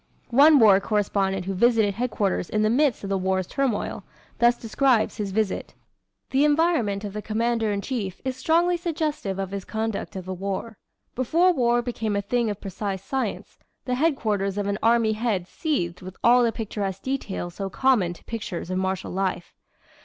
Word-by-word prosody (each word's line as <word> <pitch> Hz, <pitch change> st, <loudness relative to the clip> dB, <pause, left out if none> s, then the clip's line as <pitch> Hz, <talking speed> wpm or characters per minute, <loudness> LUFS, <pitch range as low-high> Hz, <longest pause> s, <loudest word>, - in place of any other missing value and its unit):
One 290 Hz, +5 st, +7 dB
war 210 Hz, -6 st, +7 dB
correspondent 195 Hz, -2 st, 0 dB
who 195 Hz, -, -2 dB
visited 220 Hz, 0 st, +3 dB
headquarters 210 Hz, -5 st, -1 dB
in 215 Hz, 0 st, +1 dB
the 215 Hz, -, +3 dB
midst 270 Hz, -2 st, +2 dB
of 195 Hz, -, -4 dB
the 195 Hz, -, +1 dB
War's 190 Hz, 0 st, 0 dB
turmoil, 255 Hz, 0 st, -2 dB, 0.4 s
thus 240 Hz, 0 st, +4 dB
describes 240 Hz, 0 st, +1 dB
his 205 Hz, -2 st, -2 dB
visit: 210 Hz, -1 st, -2 dB, 0.6 s
"The 270 Hz, +2 st, +3 dB
environment 295 Hz, -, +2 dB
of 205 Hz, -2 st, -5 dB
the 210 Hz, -, -4 dB
Commander 225 Hz, 0 st, 0 dB
in 200 Hz, -1 st, -1 dB
chief 200 Hz, -7 st, -4 dB
is 260 Hz, -1 st, -1 dB
strongly 340 Hz, +6 st, +2 dB
suggestive 310 Hz, -, -2 dB
of 195 Hz, -1 st, -3 dB
his 200 Hz, -1 st, -4 dB
conduct 220 Hz, -1 st, -3 dB
of 185 Hz, -2 st, -6 dB
the 190 Hz, -, -4 dB
war. 195 Hz, +4 st, -4 dB, 0.4 s
Before 335 Hz, +9 st, +3 dB
war 240 Hz, -4 st, +2 dB
became 225 Hz, -3 st, -2 dB
a 200 Hz, -, +1 dB
thing 235 Hz, +2 st, 0 dB
of 205 Hz, -1 st, -4 dB
precise 195 Hz, -1 st, -4 dB
science, 265 Hz, +5 st, -4 dB, 0.3 s
the 250 Hz, -, -1 dB
headquarters 215 Hz, -, 0 dB
of 205 Hz, -, -1 dB
an 200 Hz, +1 st, -1 dB
army 230 Hz, -1 st, +3 dB
head 215 Hz, -5 st, -1 dB
seethed 180 Hz, -, -2 dB
with 185 Hz, 0 st, -9 dB
all 245 Hz, +1 st, +6 dB
the 235 Hz, -1 st, +3 dB
picturesque 200 Hz, -4 st, -4 dB
details 210 Hz, -10 st, -3 dB
so 195 Hz, +1 st, -4 dB
common 210 Hz, -5 st, +2 dB
to -, -, -17 dB
pictures 205 Hz, -6 st, -5 dB
of 185 Hz, -, 0 dB
martial 190 Hz, 0 st, -2 dB
life. 185 Hz, -2 st, -2 dB
215 Hz, 180 wpm, -25 LUFS, 195-250 Hz, 0.6 s, One